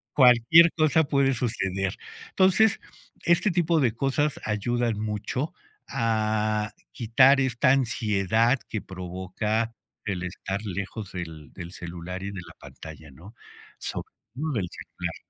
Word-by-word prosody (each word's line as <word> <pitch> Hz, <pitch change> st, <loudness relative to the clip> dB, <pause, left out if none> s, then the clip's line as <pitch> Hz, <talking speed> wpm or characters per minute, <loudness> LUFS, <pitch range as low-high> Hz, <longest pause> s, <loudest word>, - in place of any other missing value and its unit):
Cualquier 130 Hz, +6 st, +7 dB
cosa 155 Hz, +1 st, +4 dB
puede 140 Hz, -2 st, +2 dB
suceder. 95 Hz, -6 st, -2 dB, 0.3 s
Entonces, 200 Hz, +3 st, +4 dB, 0.5 s
este 175 Hz, +4 st, +3 dB
tipo 170 Hz, -2 st, +2 dB
de 120 Hz, -4 st, +3 dB
cosas 140 Hz, +2 st, 0 dB
ayudan 115 Hz, +1 st, 0 dB
mucho 110 Hz, -, -3 dB, 0.4 s
a 110 Hz, -1 st, 0 dB, 0.2 s
quitar 135 Hz, +3 st, +5 dB
esta 130 Hz, +1 st, +2 dB
ansiedad 115 Hz, -1 st, +2 dB
que 110 Hz, -, -3 dB
provoca 95 Hz, +5 st, -3 dB, 0.3 s
el 90 Hz, -4 st, -2 dB
estar 95 Hz, +2 st, -4 dB
lejos 100 Hz, +1 st, -5 dB
del 80 Hz, -5 st, -7 dB
del 85 Hz, -1 st, -9 dB
celular 90 Hz, +2 st, -7 dB
y -, -, -4 dB
de 95 Hz, -, -6 dB
la -, -, -12 dB
pantalla, 80 Hz, -2 st, -11 dB
¿no? 95 Hz, -, -14 dB, 0.4 s
Sobre -, -, -5 dB, 0.3 s
todo 150 Hz, +3 st, -3 dB
del 95 Hz, -7 st, -2 dB
celular. -, -, -6 dB
110 Hz, 125 wpm, -26 LUFS, 95-135 Hz, 0.5 s, Cualquier